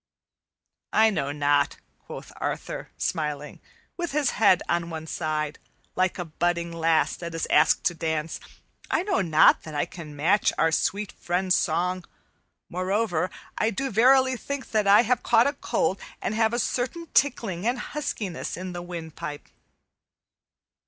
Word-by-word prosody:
"I 220 +1 +5
know 145 -7 -1
not," 145 -1 +1 0.2
quoth - - -10
Arthur, - - -4
smiling, 150 -3 -3 0.4
with 345 -5 -3
his 290 -3 +2
head 205 -4 +4
on 170 0 0
one 160 -1 -6
side, 155 -2 -3 0.4
like 185 -1 +1
a 175 - -3
budding 170 +1 -1
lass 165 -1 +2
that 170 -1 -6
is 165 - -1
asked - - +4
to 175 - +2
dance, 160 -1 -2 0.5
"I 325 - +1
know 385 - +1
not 160 -4 +5
that 155 -2 -9
I 145 - +1
can 155 -4 -10
match 180 +8 +3
our 165 - +3
sweet 200 +4 0
friend's 180 +1 0
song; 180 +1 0 0.6
moreover, 185 -1 0 0.3
I 220 - +2
do 265 +5 -3
verily 260 +4 +5
think 280 +2 -6
that 215 -2 +1
I 205 +3 +7
have 245 0 +1
caught 235 0 +4
a 285 - +1
cold 195 - -1 0.2
and - - -2
have 220 0 +2
a - - 0
certain 255 +8 -2
tickling 225 -8 +1
and 245 +2 +1
huskiness 230 - -4
in 185 0 -6
the 175 - -5
windpipe." 160 -4 -7
180 Hz, 150 wpm, -26 LUFS, 160-225 Hz, 0.6 s, I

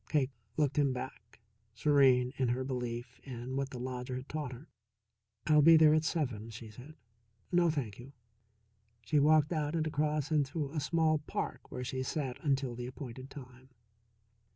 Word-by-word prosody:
Cake 140 -3 +1 0.3
looked 150 -2 +1
him 140 -2 +3
back, 125 -3 -8 0.3
serene 130 -1 +4
in 130 - +1
her 125 +2 0
belief 125 -1 -4
in 125 -1 -6
what 135 0 -1
the 130 - -7
lodger 125 0 -4
had 130 +2 -6
taught 150 -4 -4
her. 130 +6 -10 0.8
"I'll 150 -1 +5
be 165 +2 +8
there 155 -1 +7
at 155 0 +3
seven," 125 -10 -2
she 110 0 -9
said. 130 +8 -12 0.6
"No, 175 -1 +4
thank 120 -9 -3
you." 130 +3 -11 0.9
She 145 +7 +3
walked 155 +2 +4
out 150 0 -1
and 160 -1 +1
across 150 0 0
into 145 -1 0
a 155 - -2
small 155 +2 +2
park - - -4
where 125 - -4
she 130 +1 -3
sat 130 -1 -3
until 135 -4 +1
the 120 +1 -5
appointed 130 0 -8
time. 130 -2 -12
135 Hz, 170 wpm, -32 LUFS, 125-150 Hz, 0.9 s, be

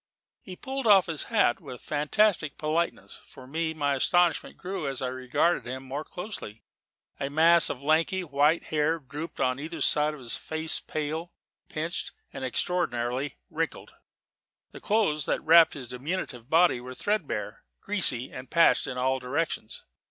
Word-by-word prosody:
He 185 - -9
pulled 265 +4 -4
off 195 -3 +7
his 165 -4 -3
hat 205 - +2
with - - -8
a - - -11
fantastic 155 - +1
politeness. 160 +3 -2
For 130 - -13
me, 160 +4 -2
my 145 -2 +1
astonishment 175 +5 +2
grew 180 -4 -4
as 135 -2 -2
I 130 - -2
regarded 130 +5 0
him 130 +2 -5
more 135 +3 -5
closely. 175 - -7 0.6
A 140 -1 -2
mass 165 +3 +5
of 135 0 -5
lanky, 165 +5 +2
white 150 +1 +2
hair 155 +1 +1
drooped 150 +2 -8
on 130 +1 +1
either 155 +3 -6
side 150 0 +3
of - - -12
a 125 - -11
face 160 +6 -2
pale, 155 +3 -4 0.4
pinched, 165 +3 -3 0.2
and 135 - -6
extraordinarily 130 -3 -1
wrinkled; 165 0 -3 0.8
the - - -10
clothes 195 -9 +1
that - - 0
wrapped 165 0 +7
his 130 -4 -7
diminutive 125 -2 -4
body 165 -6 +4
were 130 +1 -8
threadbare, 210 +8 -2 0.2
greasy, 135 - 0
and 130 0 -9
patched 170 -1 +4
in 130 -2 -4
all 130 +1 +1
directions. 130 -2 -3
155 Hz, 160 wpm, -27 LUFS, 130-170 Hz, 0.8 s, off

